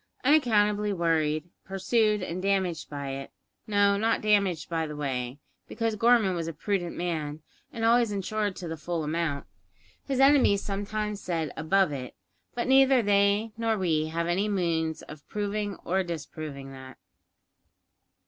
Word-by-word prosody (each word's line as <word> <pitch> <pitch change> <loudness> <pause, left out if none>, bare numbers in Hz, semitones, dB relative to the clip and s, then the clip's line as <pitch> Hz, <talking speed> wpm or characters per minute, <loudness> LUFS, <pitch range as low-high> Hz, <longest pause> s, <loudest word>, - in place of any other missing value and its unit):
Unaccountably 210 -7 +3
worried, 160 -4 +1 0.2
pursued, 210 +2 +1
and 180 0 -4
damaged 190 -4 0
by 140 -1 -5
it 135 0 -6 0.4
no, 205 -1 +3
not 225 +2 +1
damaged, 200 -6 +2
by 165 -2 -1
the 150 - -7
way; 130 -3 -3 0.3
because 225 -2 -2
Gorman 230 -3 +4
was 165 -2 -3
a 165 - -4
prudent 180 -1 -2
man, 155 -3 -3 0.3
and 225 -2 -2
always 235 -1 +4
insured 205 0 -2
to 175 - -7
the 160 0 -5
full 165 +1 -3
amount. 155 -2 -2 0.6
His 270 -2 -2
enemies 270 -7 +5
sometimes 205 +1 -3
said 165 -4 -2
above 185 +2 +2
it; 130 -3 -6 0.4
but 240 - -2
neither 265 -1 +5
they 200 +2 +2
nor 225 -1 0
we 160 -5 +1
have 165 +1 -2
any 190 +5 0
means 165 -5 -1
of 150 -1 -12
proving 205 -1 -2
or 190 +2 +1
disproving 155 -5 -6
that. 130 -1 -11
190 Hz, 150 wpm, -27 LUFS, 160-210 Hz, 0.6 s, enemies